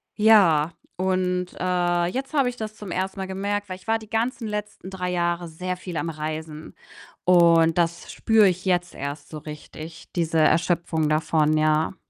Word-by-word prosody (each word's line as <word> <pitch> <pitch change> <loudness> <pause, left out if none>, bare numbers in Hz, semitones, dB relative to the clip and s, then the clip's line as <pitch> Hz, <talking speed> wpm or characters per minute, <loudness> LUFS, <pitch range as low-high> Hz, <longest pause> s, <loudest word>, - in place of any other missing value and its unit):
ja 175 -8 +5 0.2
und, 185 -1 0
äh, 175 -1 +1
jetzt 265 - -4
habe 275 -4 +3
ich 245 - -3
das 215 -2 -6
zum 205 -3 -8
1. 190 +2 -3
Mal 190 - -2
gemerkt, 200 +2 -2
weil 185 - -5
ich 185 - -17
war 225 0 +2
die 215 -1 -14
ganzen 225 +1 -1
letzten 210 -3 -5
3 180 -1 -3
Jahre 175 -1 -1
sehr 180 +3 -4
viel 180 -2 -7
am 160 +3 -2
Reisen 155 0 -6 0.5
und 170 -2 +5
das 170 0 -1
spüre 220 -3 +4
ich 180 0 -1
jetzt 175 -1 0
erst 145 +1 -6
so 155 - -7
richtig, 155 +2 -10
diese 165 -1 0
Erschöpfung 165 -1 +2
davon, 155 0 +2
ja. 155 +3 +2
175 Hz, 175 wpm, -24 LUFS, 160-190 Hz, 0.5 s, ja